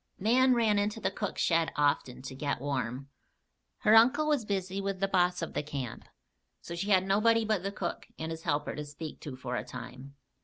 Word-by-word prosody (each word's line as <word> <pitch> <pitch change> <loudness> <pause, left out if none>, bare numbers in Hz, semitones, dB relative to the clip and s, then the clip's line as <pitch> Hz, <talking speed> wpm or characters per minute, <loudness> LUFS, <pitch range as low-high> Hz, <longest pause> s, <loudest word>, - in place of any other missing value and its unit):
Nan 250 +5 +4
ran 220 -3 +3
into 210 +2 -1
the - - -1
cook 205 - -4
shed 165 -1 +2
often 140 -3 0
to 135 - -6
get 140 +1 -2
warm. 135 -1 -3 0.7
Her 215 - +5
uncle 255 +7 +6
was 295 -7 +1
busy 195 -1 -2
with 195 -1 -3
the 195 - +1
boss 180 -2 +2
of 165 - -5
the - - 0
camp, 140 -5 -6 0.5
so 170 - -8
she 195 +4 -3
had 190 -2 +4
nobody 220 +3 +3
but 215 -4 +1
the 195 +1 -3
cook 185 -4 -4
and 160 +1 -4
his 160 0 -5
helper 145 -3 -1
to 150 - -4
speak 150 +1 -8
to 140 -4 -7
for 130 -1 -4
a - - -2
time. 130 +3 -9
180 Hz, 205 wpm, -30 LUFS, 145-210 Hz, 0.7 s, uncle